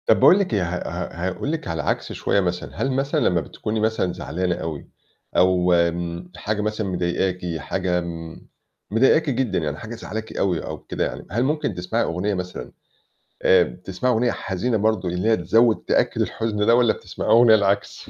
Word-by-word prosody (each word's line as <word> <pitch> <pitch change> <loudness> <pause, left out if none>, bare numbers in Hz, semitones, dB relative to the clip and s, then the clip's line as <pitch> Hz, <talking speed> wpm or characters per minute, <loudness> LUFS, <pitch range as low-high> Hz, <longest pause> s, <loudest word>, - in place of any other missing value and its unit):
طَب - - +4
باقول 190 - +7
لِك 195 - -1
إيه، 100 - +2
ه 85 +1 -2
ه 85 0 -4
هاقول 140 +10 -3
لِك 165 -1 -4
على 80 0 -2
العكس - - -2
شوية - - 0
مثلًا، 90 -2 -2
هل 135 - +1
مثلًا 140 +4 0
لمّا 90 - +2
بتكوني 110 +5 -4
مثلًا 110 -5 0
زعلانة 90 +2 -2
أوي 80 -3 -6 0.5
أو 90 -1 +4 0.2
م 85 +1 -5
حاجة 105 +4 -2
مثلًا 110 0 -2
مضايقاكِ، 90 -1 -1
حاجة 90 +3 -1
م 85 -1 -7 0.5
مضايقاكِ 135 +7 +4
جدًا 125 -7 0
يعني 75 -3 -3
حاجة 110 +6 -7
مزعّلاكِ 110 0 -6
أوي 90 -4 0
أو - - -5
كده - - -3
يعني، - - -6
هل 115 +5 +1
ممكن 150 -4 0
تسمعي 90 +7 -1
أغنية 90 +5 -1
مثلًا 90 -1 -5 0.7
آآ 95 -1 +6
بتسمعي 95 +8 -2
أغنية 120 +2 +2
حزينة 110 +5 -1
برضه، 105 -3 +1
اللي 90 +5 0
هي 110 - +4
تزوّد، 115 +6 +4
تأكّد - - +1
الحُزن 105 -2 -1
ده 115 - +5
والّا 120 -2 +4
بتسمعي - - -6
أغنية 115 -1 +7
العكس؟ 100 -1 -1
95 Hz, 180 wpm, -23 LUFS, 90-115 Hz, 0.7 s, باقول